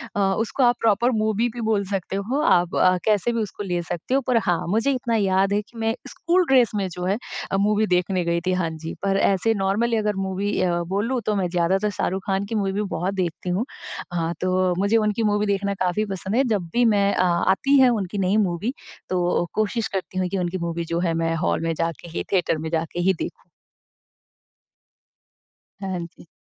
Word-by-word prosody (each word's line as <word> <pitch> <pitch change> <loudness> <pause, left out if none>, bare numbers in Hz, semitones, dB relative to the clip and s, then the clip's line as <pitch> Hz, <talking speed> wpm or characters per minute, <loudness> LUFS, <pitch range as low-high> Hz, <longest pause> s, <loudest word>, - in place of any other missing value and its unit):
अ, - - 0
उसको 205 +6 +1
आप 245 0 +5
proper 230 +3 +3
movie 220 +1 +1
भी 240 - -5
बोल 215 -2 +1
सकते 190 -1 -3
हो, 230 +9 -1
आप 175 - +3
अ, 185 0 +4
कैसे 215 +1 +3
भी 230 - -1
उसको 205 -1 -5
ले 175 -3 -1
सकते 175 +8 -4
हो। 275 - +3
पर 245 -2 +3
हाँ, 175 -1 0
मुझे 225 +8 +2
इतना 240 -3 -1
याद 195 -1 +2
है 205 - +2
कि 230 +3 -18
मैं 225 +1 0
स्कूल 365 0 +1
ड्रेस 250 -4 +5
में 195 -2 0
जो 180 +1 -5
है 195 +3 +1 0.3
अ, 195 - +2
मूवी 210 +2 +2
देखने 180 0 +1
गई 170 0 0
थी, 185 - +2
हाँ 180 -3 0
जी। 160 +1 -6
पर 195 0 +2
ऐसे 225 +4 +2
नॉर्मली 225 +4 +1
अगर 210 -1 0
मूवी 195 +2 -2
अ, 175 -1 +1
बोलूँ 235 +5 0
तो 210 - +1
मैं 190 -3 0
ज़्यादातर 185 +4 +1
शाहरुख 190 -1 -2
खान 195 +1 0
की 225 - -4
मूवी 200 0 0
बहुत 180 +4 -1
देखती 180 -1 -3
हूँ। 195 +8 0 0.5
हाँ, 170 -1 -1
तो 185 0 +2
मुझे 200 +3 +3
उनकी 215 0 +1
मूवी 210 0 +1
देखना 200 0 0
काफ़ी 185 +4 0
पसंद 195 +1 -3
है। 265 - +4
जब 200 -7 -1
भी 245 - +3
मैं 200 -3 +3
अ, 185 - +2
आती 190 +10 +3
है 255 -1 +7
उनकी 205 -4 -2
नई 195 +2 +2
मूवी 205 +5 0 0.4
तो 180 -1 0 0.3
कोशिश 220 +1 0
करती 190 -1 -5
हूँ 185 - 0
कि 195 - -2
उनकी 180 +1 -1
मूवी 170 0 -2
जो 170 +1 -2
है, 170 -2 0
मैं 165 0 0
हॉल 165 - 0
में 165 0 0
जाके 165 +1 -3
ही 165 - -3
थिएटर 180 -4 +2
में 160 +1 -4
जाके 165 +1 -2
ही 190 +2 +3
देखूँ। 170 - -4 2.5
हाँ 190 -2 -3
जी। 170 0 -18
195 Hz, 210 wpm, -23 LUFS, 180-220 Hz, 2.5 s, है